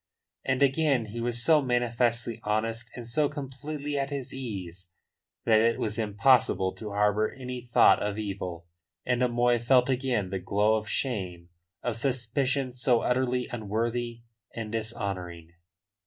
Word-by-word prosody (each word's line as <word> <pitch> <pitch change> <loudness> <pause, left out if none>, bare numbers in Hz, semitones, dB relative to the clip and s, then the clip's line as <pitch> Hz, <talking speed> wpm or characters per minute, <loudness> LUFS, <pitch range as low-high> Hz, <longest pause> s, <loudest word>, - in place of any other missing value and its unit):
And 130 +1 +1
again 135 -3 +2
he 120 - -4
was 120 0 -1
so 155 -2 +6
manifestly 120 -2 0
honest 115 +2 -1
and 120 -2 -7
so 145 +5 +1
completely 145 +1 -5
at 135 0 -1
his 140 -3 -5
ease 95 -8 -6 0.6
that 110 -1 +5
it 115 +1 +3
was 110 0 -2
impossible 105 -3 +3
to 110 - -6
harbour 105 +1 +2
any 125 -1 -6
thought 120 -1 +5
of 105 0 -2
evil, 95 -5 -5 0.4
and 125 0 +1
O'Moy 120 -1 +3
felt 125 +2 +4
again 125 -7 0
the 95 - -2
glow 105 +4 +2
of 110 0 -1
shame 90 -9 -2 0.3
of 120 -3 -1
suspicions 130 +1 0
so 120 -3 +3
utterly 125 0 0
unworthy 115 +2 -2 0.3
and 110 -2 -5
dishonouring. 100 -7 -4
120 Hz, 140 wpm, -28 LUFS, 105-125 Hz, 0.6 s, so